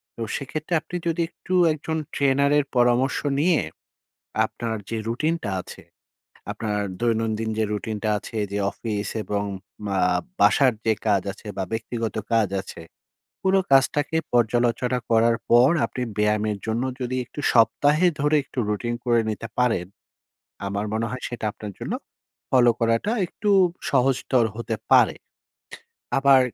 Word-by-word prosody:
তো -, -, -8 dB
সেক্ষেত্রে 155 Hz, +4 st, -4 dB
আপনি 180 Hz, -, -9 dB
যদি 165 Hz, +1 st, 0 dB
একটু 185 Hz, -, -7 dB, 0.2 s
একজন 160 Hz, +1 st, -3 dB, 0.2 s
ট্রেনারের 140 Hz, +1 st, +3 dB
পরামর্শ 125 Hz, +2 st, +3 dB, 0.2 s
নিয়ে 165 Hz, +2 st, +3 dB, 0.8 s
আপনার 115 Hz, -1 st, -4 dB
যে 115 Hz, -, -2 dB
রুটিনটা 155 Hz, +1 st, -1 dB
আছে, -, -, -12 dB, 0.7 s
আপনার 105 Hz, -2 st, -2 dB, 0.2 s
দৈনন্দিন 115 Hz, -1 st, 0 dB
যে 110 Hz, -, +2 dB
রুটিনটা 110 Hz, +1 st, -3 dB
আছে 110 Hz, -, -7 dB
যে, 100 Hz, -, -2 dB
অফিস 105 Hz, -3 st, -4 dB, 0.2 s
এবং 100 Hz, +1 st, -2 dB, 0.4 s
মা 100 Hz, -1 st, -1 dB, 0.4 s
বাসার 130 Hz, -3 st, +5 dB
যে 110 Hz, -, +4 dB
কাজ 100 Hz, -3 st, +3 dB
আছে 105 Hz, +2 st, -13 dB
বা, 95 Hz, -, 0 dB
ব্যক্তিগত 115 Hz, 0 st, -3 dB, 0.2 s
কাজ 110 Hz, -4 st, +3 dB
আছে। 85 Hz, -, -10 dB, 0.6 s
পুরো 190 Hz, 0 st, +3 dB
কাজটাকে 145 Hz, +3 st, +3 dB, 0.2 s
পর্যালোচনা 120 Hz, +1 st, +2 dB
করার 115 Hz, 0 st, +4 dB
পর, 120 Hz, +3 st, +6 dB, 0.2 s
আপনি 125 Hz, -, -6 dB, 0.2 s
ব্যায়ামের 105 Hz, 0 st, +1 dB
জন্য 115 Hz, +2 st, -1 dB, 0.2 s
যদি 125 Hz, 0 st, -2 dB
একটু 135 Hz, -, -10 dB
সপ্তাহে 145 Hz, +9 st, +4 dB
ধরে 150 Hz, +2 st, +2 dB
একটু 135 Hz, -, -6 dB
রুটিন 105 Hz, +3 st, -1 dB
করে 120 Hz, -1 st, +3 dB
নিতে 110 Hz, +1 st, -4 dB
পারেন, 115 Hz, -8 st, +2 dB, 0.8 s
আমার 100 Hz, +1 st, -2 dB
মনে 110 Hz, +1 st, 0 dB
হয় 125 Hz, 0 st, -6 dB
সেটা 120 Hz, -2 st, -6 dB
আপনার 105 Hz, 0 st, -8 dB
জন্য -, -, -4 dB, 0.6 s
ফলো 125 Hz, -2 st, +5 dB
করাটা 115 Hz, -, +1 dB
একটু 205 Hz, +4 st, -2 dB, 0.4 s
সহজতর 130 Hz, -2 st, +2 dB
হতে 115 Hz, -1 st, -3 dB, 0.2 s
পারে। -, -, +6 dB, 1.0 s
আবার 135 Hz, -1 st, +6 dB
120 Hz, 135 wpm, -24 LUFS, 110-135 Hz, 1.0 s, পর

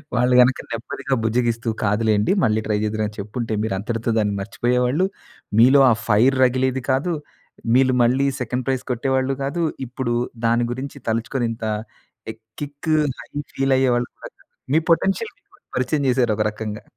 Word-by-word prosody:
వాళ్ళు 125 Hz, +1 st, +3 dB
గనక 125 Hz, +1 st, +5 dB
నెమ్మదిగా 115 Hz, +3 st, -3 dB
బుజ్జగిస్తూ 115 Hz, 0 st, 0 dB
కాదులెండి 105 Hz, -, +2 dB
మళ్ళీ 110 Hz, -2 st, +2 dB
ట్రై 105 Hz, -1 st, +1 dB
చేద్దురు, 110 Hz, 0 st, -1 dB
అని 105 Hz, -, -11 dB
చెప్పుంటే 110 Hz, +3 st, -4 dB
మీరంతటితో 110 Hz, +3 st, -2 dB
దాన్ని 105 Hz, -2 st, +1 dB
మర్చిపోయేవాళ్ళు. 125 Hz, -, +1 dB, 0.5 s
మీలో 130 Hz, +5 st, +7 dB
ఆ -, -, +5 dB
ఫైర్ 115 Hz, +5 st, +4 dB
రగిలేది 130 Hz, +1 st, +1 dB
కాదు. 140 Hz, +7 st, 0 dB, 0.6 s
మీలు 130 Hz, 0 st, +4 dB
మళ్ళీ 130 Hz, +4 st, +2 dB, 0.2 s
సెకండ్ 125 Hz, +1 st, -2 dB
ప్రైజ్ 130 Hz, -2 st, 0 dB
కొట్టేవాళ్ళు 130 Hz, +2 st, 0 dB
కాదు. 145 Hz, +5 st, -2 dB, 0.2 s
ఇప్పుడు 125 Hz, 0 st, -3 dB, 0.3 s
దాని 115 Hz, +1 st, +3 dB
గురించి 130 Hz, +3 st, -6 dB
తలుచుకొని 115 Hz, +2 st, -1 dB
ఇంత 115 Hz, 0 st, -6 dB, 0.7 s
ఎ -, -, -10 dB, 0.3 s
కిక్ 145 Hz, +2 st, -6 dB, 0.3 s
హై -, -, -11 dB, 0.2 s
ఫీల్ 135 Hz, 0 st, +1 dB
అయ్యేవాళ్ళు 125 Hz, -2 st, +1 dB
కాదు. -, -, -10 dB, 0.4 s
మీ 160 Hz, -, +5 dB
పొటెన్షియల్ 195 Hz, -, +1 dB
మీకు -, -, -28 dB, 0.2 s
పరిచయం 150 Hz, -2 st, 0 dB
చేశారు 120 Hz, -3 st, +2 dB
ఒక 105 Hz, -, +2 dB
రకంగా. 105 Hz, 0 st, -6 dB
125 Hz, 150 wpm, -21 LUFS, 110-130 Hz, 0.7 s, మీలో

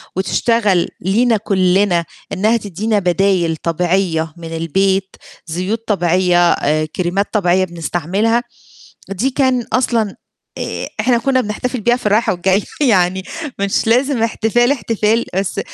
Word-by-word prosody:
وتشتغل 200 Hz, -1 st, +1 dB
لينا 225 Hz, +5 st, +2 dB
كُلّنا 190 Hz, -3 st, +1 dB, 0.3 s
إنها 220 Hz, +5 st, +2 dB
تدّينا 210 Hz, +1 st, -1 dB
بدايل 180 Hz, -2 st, +1 dB
طبيعية 170 Hz, -1 st, -1 dB
من 165 Hz, -1 st, -7 dB
البيت، 190 Hz, +4 st, 0 dB, 0.3 s
زيوت 185 Hz, +7 st, -3 dB
طبيعية، 175 Hz, -2 st, +3 dB
آآ 155 Hz, +2 st, 0 dB
كريمات 185 Hz, +3 st, -1 dB
طبيعية 185 Hz, -3 st, +2 dB
بنستعملها، 180 Hz, +7 st, -1 dB, 0.7 s
دي 195 Hz, +8 st, -1 dB
كان 260 Hz, -2 st, +1 dB
أصلًا 230 Hz, -5 st, +1 dB, 0.4 s
آآ -, -, -4 dB
إحنا 245 Hz, -2 st, +2 dB
كنّا 260 Hz, +2 st, +1 dB
بنحتفل 250 Hz, +3 st, -3 dB
بيها 240 Hz, +3 st, +2 dB
في 250 Hz, -, -7 dB
الرايحة 215 Hz, +3 st, +2 dB
والجاية 190 Hz, +3 st, +1 dB, 0.2 s
يعني 190 Hz, -8 st, +2 dB, 0.4 s
مش 200 Hz, +2 st, 0 dB
لازم 250 Hz, +2 st, +2 dB
احتفال 230 Hz, +3 st, +2 dB
احتفال، 225 Hz, -2 st, 0 dB
بس 195 Hz, +1 st, -1 dB
195 Hz, 120 wpm, -17 LUFS, 180-230 Hz, 0.7 s, طبيعية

